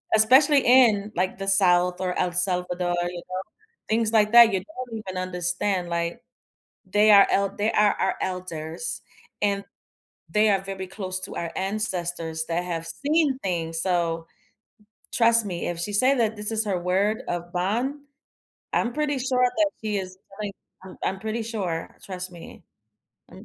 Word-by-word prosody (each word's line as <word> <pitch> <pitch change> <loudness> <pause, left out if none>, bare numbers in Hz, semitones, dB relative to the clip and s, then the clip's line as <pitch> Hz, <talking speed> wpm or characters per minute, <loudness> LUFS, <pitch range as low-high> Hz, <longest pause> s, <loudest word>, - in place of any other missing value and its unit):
Especially 265 +7 +6
in, 220 -5 +5
like, 185 +2 -1
the 195 - -5
South 180 -2 +3
or 180 -1 -2
El 180 - +1
Salvador, 180 -1 -1
you 175 - -7
know? 185 +1 -5 0.5
Things 225 0 +1
like 215 -1 +3
that, 235 -2 +9
you 190 - +1
don't 255 -7 -7
even 190 -3 -7
understand, 180 +1 -1
like, 170 0 -2 0.7
they 210 +2 +5
are 200 -1 +8
el 200 0 +2
they 215 +2 0
are 210 -2 +4
our - - +1
elders, 175 +1 -4 0.4
and 200 -1 +1 0.7
they 215 0 +3
are 195 -1 +2
very 195 -1 -6
close 185 -1 -5
to 185 - -7
our 170 -1 -3
ancestors 175 -5 -2
that 170 +1 -1
have 165 -2 -4
seen 290 - 0
things, 165 -6 -2
so 165 -3 -1 0.8
trust 230 -1 +4
me, 180 -4 -3
if 175 - -3
she 175 +4 -3
say 255 +7 +4
that 225 -2 +1
this 210 +1 -3
is 220 0 0
her 195 -4 -1
word 195 +5 +1
of 175 0 -4
bond, 215 +10 -1 0.8
I'm 240 - +1
pretty 295 0 -1
sure 255 -1 +1
that 315 -2 +3
she 210 -2 -1
is 185 0 -7 0.2
telling 205 -1 -3 0.3
Um, 190 - -11
I'm 190 - -1
pretty 220 +2 -3
sure, 195 -8 -4
trust 185 -1 -6
me. 170 -1 -12 0.7
I'm - - -13
195 Hz, 165 wpm, -25 LUFS, 180-220 Hz, 0.8 s, that